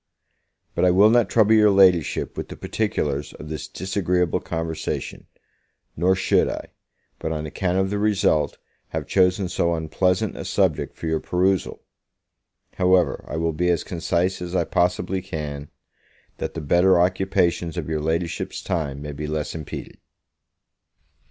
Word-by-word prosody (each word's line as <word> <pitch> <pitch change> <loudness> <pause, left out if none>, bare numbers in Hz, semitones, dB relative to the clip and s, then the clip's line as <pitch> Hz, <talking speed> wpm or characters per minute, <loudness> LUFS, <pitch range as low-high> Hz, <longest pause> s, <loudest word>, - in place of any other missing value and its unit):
But - - 0
I 90 - +6
will 100 +4 +6
not 120 -4 +3
trouble 110 -1 +4
your 105 -1 +6
Ladyship 95 -5 +3
with - - -5
the - - -8
particulars 75 -10 -2
of 75 - -10
this 80 -3 -5
disagreeable 90 -2 0
conversation; 80 -1 -4 0.7
nor 90 +4 +3
should 95 - +2
I, - - -6 0.5
but 80 - -3
on 80 -1 -3
account 90 +4 -1
of 95 0 +1
the 105 - -1
result, 100 -8 +1 0.3
have - - -4
chosen 95 0 +2
so 85 -1 0
unpleasant 90 +5 0
a - - -6
subject - - 0
for - - -7
your 80 -1 0
perusal. 90 +2 0 0.9
However, 90 -1 +3
I - - -4
will 80 0 0
be 90 +3 0
as 85 -2 +1
concise 90 +2 -1
as 90 +1 -5
I 90 - +3
possibly 90 +2 0
can, 75 -4 -6 0.7
that - - -5
the 80 - -3
better 90 +4 +4
occupations 90 -2 +1
of - - -3
your 80 -1 -2
Ladyship's 80 +2 -2
time 75 -6 -3
may 75 - -5
be 75 +1 -5
less 75 0 -3
impeded. 80 -3 -7
90 Hz, 150 wpm, -23 LUFS, 80-95 Hz, 0.9 s, I